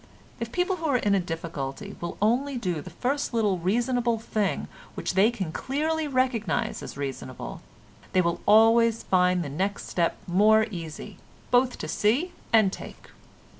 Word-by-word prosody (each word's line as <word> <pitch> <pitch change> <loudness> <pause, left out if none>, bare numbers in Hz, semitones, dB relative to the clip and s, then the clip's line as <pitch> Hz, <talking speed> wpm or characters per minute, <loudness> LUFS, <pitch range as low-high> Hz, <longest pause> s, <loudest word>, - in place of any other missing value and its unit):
If 230 0 -4
people 365 +4 0
who 325 -1 -3
are 275 -4 +3
in 205 -4 +1
a 195 - +4
difficulty 165 +1 -5
will 170 - -5
only 255 +5 +1
do 180 -9 -2
the - - -9
first 270 0 -2
little 205 -5 +2
reasonable 235 +5 +1
thing 215 -3 -1 0.3
which - - -2
they 195 +4 +5
can 195 -9 -4
clearly 310 - -1
recognise 255 - 0
as - - -8
reasonable, 135 -2 -6 0.5
they 185 - +4
will 170 0 -1
always 225 +2 +5
find 180 -1 +2
the - - -5
next 190 +8 -2
step 170 -2 0
more 215 +4 +4
easy 165 -5 -7 0.3
both 250 0 +3
to - - -5
see 270 - +1 0.2
and 215 -4 +4
take. - - -10
215 Hz, 160 wpm, -26 LUFS, 180-245 Hz, 0.5 s, they